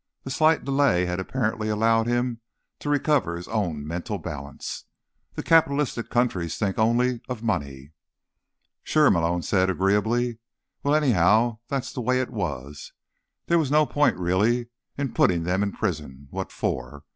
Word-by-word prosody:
The 135 Hz, -, -6 dB
slight 155 Hz, +3 st, +3 dB
delay 135 Hz, -10 st, +2 dB
had 90 Hz, +1 st, -2 dB
apparently 110 Hz, +1 st, -2 dB
allowed 115 Hz, +1 st, +2 dB
him 120 Hz, -1 st, -1 dB, 0.4 s
to 145 Hz, -, -4 dB
recover 145 Hz, -, +1 dB
his 85 Hz, +1 st, -7 dB
own 85 Hz, -10 st, -2 dB
mental 90 Hz, +6 st, -4 dB
balance. 75 Hz, -6 st, -7 dB, 0.5 s
"The -, -, -4 dB
capitalist 145 Hz, -6 st, +2 dB
countries 95 Hz, -10 st, 0 dB
think 100 Hz, -2 st, -1 dB
only 120 Hz, +2 st, +2 dB
of 120 Hz, -3 st, -5 dB
money." 70 Hz, -, -3 dB, 0.9 s
"Sure," 155 Hz, -1 st, +4 dB
Malone 85 Hz, 0 st, +1 dB
said 95 Hz, -1 st, +2 dB
agreeably. 110 Hz, +6 st, +1 dB, 0.4 s
"Well, 145 Hz, +1 st, +2 dB
anyhow, 110 Hz, -, +3 dB
that's 135 Hz, -3 st, -3 dB
the 125 Hz, -, -4 dB
way 130 Hz, +2 st, +1 dB
it 130 Hz, -, -2 dB
was. 75 Hz, -, -5 dB, 0.5 s
There 170 Hz, 0 st, +3 dB
was 150 Hz, -5 st, 0 dB
no 150 Hz, +1 st, +4 dB
point, 145 Hz, -, +2 dB
really, 105 Hz, +7 st, +1 dB, 0.3 s
in 140 Hz, -3 st, -2 dB
putting 85 Hz, -3 st, +2 dB
them 90 Hz, +3 st, 0 dB
in 100 Hz, -1 st, 0 dB
prison—what 75 Hz, -2 st, -4 dB
for? 70 Hz, -1 st, -4 dB
110 Hz, 145 wpm, -25 LUFS, 90-125 Hz, 0.9 s, Sure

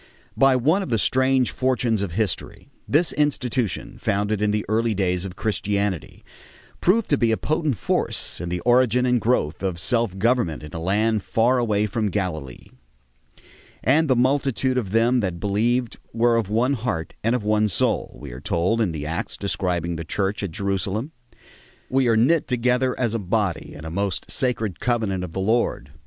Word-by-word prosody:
By 135 Hz, -1 st, +5 dB
one 155 Hz, +10 st, +2 dB
of 190 Hz, -, -5 dB
the 115 Hz, -, +2 dB
strange 130 Hz, +3 st, +2 dB
fortunes 125 Hz, -4 st, 0 dB
of 95 Hz, -5 st, -3 dB
history, 105 Hz, +1 st, -3 dB, 0.2 s
this 155 Hz, +4 st, +3 dB
institution, 130 Hz, -6 st, -1 dB
founded 105 Hz, +1 st, 0 dB
in 105 Hz, -, +2 dB
the 105 Hz, 0 st, -1 dB
early 110 Hz, +1 st, +1 dB
days 90 Hz, -1 st, 0 dB
of 95 Hz, -1 st, -7 dB
Christianity, 100 Hz, -3 st, -2 dB, 0.6 s
proved 210 Hz, +5 st, +2 dB
to 145 Hz, -, +3 dB
be 115 Hz, -2 st, +3 dB
a 110 Hz, -, +1 dB
potent 155 Hz, -5 st, -1 dB
force -, -, -1 dB
in 85 Hz, -, -4 dB
the 90 Hz, 0 st, -3 dB
origin 125 Hz, 0 st, +3 dB
and 125 Hz, -2 st, +2 dB
growth 95 Hz, -10 st, 0 dB
of 95 Hz, -3 st, -2 dB
self 115 Hz, +1 st, 0 dB
government 110 Hz, -8 st, +1 dB
in 75 Hz, -, -10 dB
a 80 Hz, -, -4 dB
land 105 Hz, +5 st, +1 dB
far 120 Hz, +6 st, +2 dB
away 105 Hz, -3 st, +1 dB
from 105 Hz, 0 st, -1 dB
Galilee. 80 Hz, -10 st, -4 dB, 1.1 s
"And 155 Hz, +6 st, +3 dB
the 130 Hz, -, +4 dB
multitude 130 Hz, 0 st, +1 dB
of 105 Hz, -6 st, -5 dB
them 115 Hz, +4 st, +3 dB
that 90 Hz, -6 st, -2 dB
believed 115 Hz, +5 st, 0 dB
were 115 Hz, +1 st, +3 dB
of 115 Hz, -4 st, 0 dB
one 120 Hz, +6 st, +2 dB
heart 110 Hz, -10 st, -3 dB
and 115 Hz, +3 st, +2 dB
of 125 Hz, -, -2 dB
one 105 Hz, 0 st, +2 dB
soul," 95 Hz, -, -1 dB
we 70 Hz, -3 st, -8 dB
are 60 Hz, +2 st, -9 dB
told 90 Hz, +9 st, 0 dB
in 95 Hz, -7 st, 0 dB
the 75 Hz, -2 st, -5 dB
Acts 80 Hz, +4 st, -4 dB
describing 90 Hz, -4 st, -2 dB
the 80 Hz, -, -4 dB
Church 95 Hz, +5 st, -1 dB
at 100 Hz, -, -2 dB
Jerusalem. 100 Hz, -, -2 dB, 0.8 s
"We 130 Hz, -1 st, +3 dB
are 115 Hz, -1 st, +3 dB
knit 150 Hz, +8 st, +3 dB
together 125 Hz, 0 st, +1 dB
as 120 Hz, -3 st, 0 dB
a 115 Hz, -, -1 dB
body 95 Hz, -3 st, -2 dB
in 75 Hz, -, -9 dB
a 80 Hz, -, -5 dB
most 100 Hz, +1 st, -3 dB
sacred 115 Hz, -7 st, -1 dB
covenant 110 Hz, -7 st, -1 dB
of 85 Hz, -3 st, -7 dB
the 95 Hz, -, -2 dB
Lord... 105 Hz, -, 0 dB
110 Hz, 180 wpm, -23 LUFS, 95-125 Hz, 1.1 s, By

